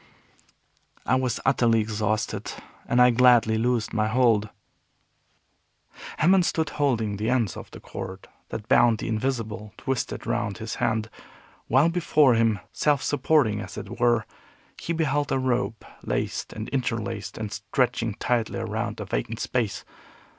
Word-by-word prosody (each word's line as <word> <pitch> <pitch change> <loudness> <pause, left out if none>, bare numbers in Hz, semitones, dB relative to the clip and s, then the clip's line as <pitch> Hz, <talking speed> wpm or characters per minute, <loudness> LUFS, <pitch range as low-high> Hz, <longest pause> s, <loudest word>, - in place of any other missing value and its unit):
I - - +1
was 130 -2 +1
utterly 120 -4 +3
exhausted, 110 -1 -2 0.4
and 120 - +2
I 125 0 +7
gladly 120 -2 +5
loosed 120 -1 0
my 110 -1 +1
hold. 110 -3 +3 1.7
Hammond 180 +3 +4
stood 160 -2 0
holding 115 -8 0
the 110 +3 -1
ends 120 -8 +1
of - - -9
the - - -11
cord 95 +1 -8 0.2
that 105 0 -6
bound 120 -3 +5
the - - -5
Invisible, 110 -2 -3
twisted 135 -1 -3
round 115 -4 -1
his 110 0 -5
hand, 110 0 0 0.6
while 135 +7 +4
before 155 -6 +3
him, 115 -2 +2
self 145 -2 +1
supporting 145 -8 +2
as - - -8
it 115 +4 -7
were, 120 -2 +3 0.5
he - - -4
beheld 145 -3 0
a - - +2
rope 120 -4 -1 0.2
laced - - -3
and 110 +1 -6
interlaced, 115 -5 -3
and 110 -2 -4
stretching 115 0 -1
tightly 120 -3 -1
around - - -3
a - - -4
vacant - - -3
space. - - -2
115 Hz, 140 wpm, -25 LUFS, 110-130 Hz, 1.7 s, I